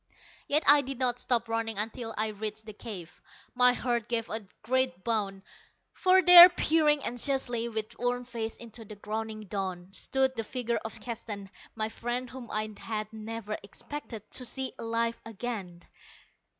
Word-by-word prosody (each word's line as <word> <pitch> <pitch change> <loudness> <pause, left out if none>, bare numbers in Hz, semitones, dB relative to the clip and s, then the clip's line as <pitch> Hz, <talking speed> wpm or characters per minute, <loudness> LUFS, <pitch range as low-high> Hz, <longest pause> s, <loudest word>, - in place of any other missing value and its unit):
Yet 300 +2 +2
I 290 0 +8
did 270 -1 -5
not 245 -1 +1
stop 235 -2 0
running 225 -1 -1
until 225 +2 -3
I 215 +1 +1
reached 215 +1 -5
the 215 - -8
cave. 195 -6 -9 0.3
My 250 0 +5
heart 240 -3 -1
gave 230 -1 -1
a 215 -2 -3 0.2
great 255 -3 0
bound. 200 -4 -1 0.5
For 375 0 +4
there, 355 0 +12
peering 310 -4 +2
anxiously 245 -1 0
with 220 -1 -5
worn 245 0 0
face 230 -2 -4
into 230 -1 -10
the 210 0 -10
growing 215 +1 -5
dawn, 190 -2 -4
stood 265 +4 0
the 225 - -2
figure 235 +1 -2
of 225 - -5
Keston 210 -5 -6 0.2
my 220 -1 -1
friend 240 +2 -4
whom 255 -2 -9
I 215 0 -2
had 215 -1 -4
never 220 -1 -5
expected 230 0 -7
to 255 - 0
see 260 +2 -3
alive 230 0 -1
again. 205 -6 -6
230 Hz, 160 wpm, -29 LUFS, 215-250 Hz, 0.5 s, there